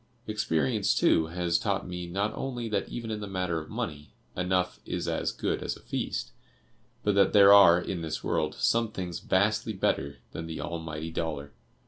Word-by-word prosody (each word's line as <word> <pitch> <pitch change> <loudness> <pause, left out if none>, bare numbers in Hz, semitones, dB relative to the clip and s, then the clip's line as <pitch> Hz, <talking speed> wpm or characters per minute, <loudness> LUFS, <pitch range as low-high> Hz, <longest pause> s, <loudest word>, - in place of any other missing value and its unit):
Experience, 80 - +1
too, 80 -1 +3
has 85 0 0
taught 100 -2 -1
me 90 -1 -5
not 100 +5 -1
only 120 -3 -4
that 105 -3 -1
even 115 -2 -5
in 105 - -3
the 105 - -5
matter 90 -4 -1
of 75 - -12
money, 75 0 -5 0.2
'enough 90 0 0
is 90 -1 -3
as 80 - 0
good - - -2
as - - -3
a - - -16
feast,' - - -3 0.7
but 105 - +2
that 100 0 +4
there 100 -1 +8
are, 90 -4 +8
in 90 0 -4
this 80 -1 -4
world, 75 0 0
some 115 -1 +1
things 90 -4 -4
vastly 105 +3 +1
better 70 -7 -1
than 80 - -6
the 80 - -5
Almighty 80 -1 -5
Dollar! 80 -4 -4
90 Hz, 180 wpm, -28 LUFS, 80-100 Hz, 0.7 s, there